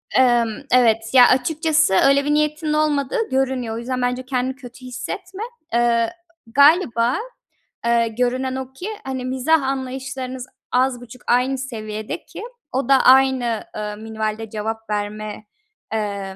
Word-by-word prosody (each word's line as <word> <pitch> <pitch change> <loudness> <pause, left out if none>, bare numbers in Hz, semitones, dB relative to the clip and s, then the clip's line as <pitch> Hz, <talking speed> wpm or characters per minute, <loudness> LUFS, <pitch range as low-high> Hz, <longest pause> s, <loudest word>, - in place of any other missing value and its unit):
Emm, 240 -3 +4 0.2
evet, 230 -3 +5
ya, 250 -2 +8
açıkçası 310 - +2
öyle 275 0 +3
bir 295 - +1
niyetinin 300 +1 0
olmadığı 305 - 0
görünüyor. 260 -3 -1
O - - -4
yüzden 250 +2 -3
bence 250 +1 -1
kendini 255 0 -1
kötü 255 -1 -12
hissetme. 365 - -6 0.3
Eee, 235 +1 +2 0.3
galiba, 265 -2 +4 0.7
eee, 235 0 +3
görünen 250 +3 -1
o 265 0 -6
ki, 360 +10 -6
hani, 260 -1 -4
mizah 265 +5 +2
anlayışlarınız 260 -1 -4 0.2
az 250 0 +1
buçuk 245 +1 -12
aynı 255 +2 +2
seviyede 215 -5 -6
ki - - -9 0.3
o 260 0 -2
da 270 -1 +5
aynı, 255 -3 +4
ııı, 210 0 -4
minvalde 220 0 -4
cevap 220 +1 -5
verme, 210 +1 -4 0.5
eee, 200 -3 -3
255 Hz, 135 wpm, -21 LUFS, 230-270 Hz, 0.7 s, ya